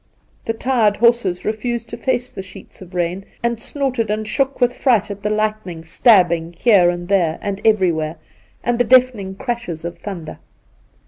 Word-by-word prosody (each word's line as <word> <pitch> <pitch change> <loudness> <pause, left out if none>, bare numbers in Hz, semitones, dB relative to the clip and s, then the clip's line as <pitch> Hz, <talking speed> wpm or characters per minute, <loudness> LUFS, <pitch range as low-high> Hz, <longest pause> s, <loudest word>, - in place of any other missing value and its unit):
The 225 - -1
tu 225 - -10
ed 215 -5 +3
horses 235 -6 +2
refused 230 +2 -2
to - - -5
face 250 +1 -1
the - - -6
sheets 190 +1 -13
of 180 0 -12
rain, 175 +2 -1 0.2
and 235 -1 -1
snorted 260 -6 -2
and 215 0 -2
shook 275 +3 -1
with 245 -1 +3
fright 230 -7 +2
at 200 0 -7
the 210 - -1
lightning 215 -6 -2
stabbing 170 -3 +3
here 195 -5 +5
and 175 0 -4
there 175 -5 +1
and 200 -1 -4
everywhere, 170 -7 +2 0.5
and 240 0 0
the - - +5
deafening 245 -6 +3
crashes 235 -9 -4
of 170 - -6
thunder. 170 -7 -7
210 Hz, 175 wpm, -19 LUFS, 180-235 Hz, 0.5 s, here